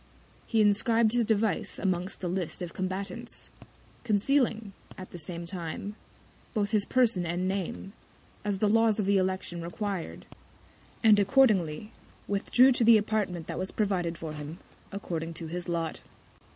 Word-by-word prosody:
He 225 -2 +3
inscrib'd 220 +2 +3
his 240 -1 +2
Device 215 -3 0
amongst 185 0 -2
the 180 - -2
List 180 0 -3
of 170 - -6
Combatants; 190 +1 -4 0.5
concealing, 225 -1 +1 0.2
at 185 - -9
the 175 - -8
same 170 +2 -5
Time, 180 +3 -5 0.6
both 205 -1 0
his 210 -2 +3
Person 235 -8 +2
and 175 +2 -1
Name, 195 0 -3 0.5
as 205 -1 -1
the 210 - +2
Laws 225 0 +3
of 205 - +1
the 200 0 +3
Election 185 -2 -2
required; 190 +1 -4 0.8
and 215 -2 +7
accordingly, 210 - +3 0.4
withdrew 245 +6 +4
to 245 - +2
the 230 0 +8
Apartment 205 -6 -1
that - - -5
was 185 +1 -1
provided 180 -5 -1
for 160 -2 -6
him, 150 +2 -7 0.3
according 165 -4 -4
to 165 - -5
his 175 +2 -5
Lot. 165 -2 -2
195 Hz, 150 wpm, -29 LUFS, 175-215 Hz, 0.8 s, the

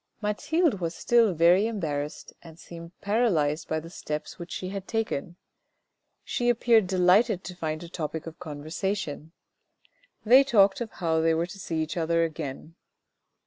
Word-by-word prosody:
Mathilde 225 - 0
was 165 0 -2
still 230 -6 +3
very 175 +6 +5
embarrassed 155 -8 -4
and 165 -2 -13
seemed 170 0 -12
paralysed 180 -9 +1
by 160 - -1
the 165 +2 -11
steps 150 -1 -6
which 170 0 -8
she 185 - -4
had 195 -1 -6
taken. 215 -8 -2 0.9
She 245 -1 -1
appeared 230 -3 +4
delighted 185 +3 +3
to 180 - -8
find 155 -1 -4
a - - -8
topic 160 -2 -5
of 165 +1 -9
conversation. 160 +1 -4 0.9
They 255 +5 +7
talked 205 -6 +3
of 235 - -3
how 160 -2 0
they 165 0 +3
were 165 +1 0
to 180 +3 -11
see 160 -3 -2
each 155 +3 -6
other 165 0 +1
again. 155 -1 -5
175 Hz, 155 wpm, -27 LUFS, 160-205 Hz, 0.9 s, They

